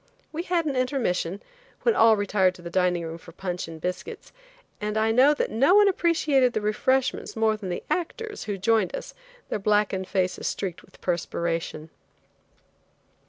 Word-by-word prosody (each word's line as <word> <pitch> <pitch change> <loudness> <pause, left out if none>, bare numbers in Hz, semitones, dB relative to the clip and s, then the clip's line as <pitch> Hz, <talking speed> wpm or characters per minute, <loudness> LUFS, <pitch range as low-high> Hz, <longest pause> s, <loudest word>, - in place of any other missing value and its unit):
We 320 - -3
had 345 -2 0
an 285 -3 -1
intermission, 220 -8 -1 0.4
when 470 -3 +3
all 225 -1 +6
retired 195 -2 +2
to 175 - -14
the 170 - -7
dining 180 -1 +1
room 165 +1 -6
for 165 - -13
punch 180 -1 -4
and 165 -1 -9
biscuits, 180 +3 -5 0.5
and 210 +1 -2
I 220 +1 +2
know 265 +6 +5
that - - -1
no 275 - +4
one 415 0 +7
appreciated 305 -9 +2
the 215 - -1
refreshments 255 +5 0
more 220 -1 +2
than 205 -3 -6
the 175 - -4
actors, 420 +5 -3
who 205 -2 -3
joined 210 -1 +1
us, - - -7 0.4
their - - -2
blackened 205 -2 +1
faces 185 -2 -1
streaked 185 -4 -3
with - - -21
perspiration. 165 -2 -2
210 Hz, 165 wpm, -25 LUFS, 180-265 Hz, 0.5 s, one